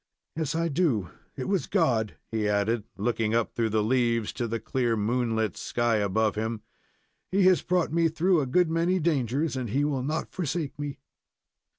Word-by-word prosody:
Yes, 160 -1 -2
I 165 +1 +1
do; 140 - 0 0.2
it 130 - -4
was 195 -2 0
God!" 120 - +1 0.2
he 110 -2 0
added, 105 +2 +1
looking 110 +1 0
up 115 -1 0
through 115 -1 0
the 110 0 +1
leaves 115 -2 +1
to 120 -2 -2
the 115 0 -2
clear, 120 -3 0
moonlit 110 -2 0
sky 120 -2 0
above 105 +1 +1
him. 110 0 -3 0.7
"He 195 +1 +3
has 185 -1 +5
brought 180 -3 0
me 165 0 +3
through 170 +1 +2
a 135 - -2
good 165 +5 +2
many 170 +3 +2
dangers, 150 -2 0
and 125 -3 -3
He 140 +7 +1
will 140 -3 -1
not 155 +5 -3
forsake 160 -4 -3
me." 145 -2 -4
125 Hz, 180 wpm, -27 LUFS, 110-160 Hz, 0.7 s, has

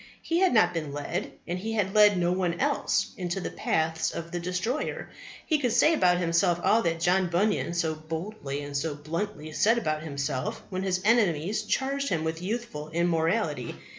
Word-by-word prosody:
He 335 +1 0
had 375 0 +4
not 175 -7 +4
been 155 -4 -3
led, 145 +6 -3 0.2
and 175 +1 -2
he 225 +4 -3
had 200 -3 0
led 210 -2 +6
no 175 0 +2
one 180 -2 0
else, - - +1
into 180 0 -2
the - - -4
paths 160 0 0
of 170 0 -6
the 175 - -2
destroyer. 180 - -3 0.3
He 310 -2 +2
could 245 -5 0
say 300 +7 +5
about 180 - +3
himself 175 0 +2
all 225 - +4
that 165 -3 -1
John 180 +2 +2
Bunyan 175 -1 0
so 160 -2 +1
boldly 155 -2 -5
and 145 0 -7
so 150 +1 -1
bluntly 155 +2 -4
said 225 +9 +3
about 155 -9 -1
himself 140 -3 -3
when 185 0 -2
his 185 -1 0
enemies 210 -4 +2
charged 275 +5 -1
him 160 -2 0
with 160 +1 -3
youthful 190 -7 -4
immorality. 170 +5 0
175 Hz, 185 wpm, -27 LUFS, 160-210 Hz, 0.3 s, led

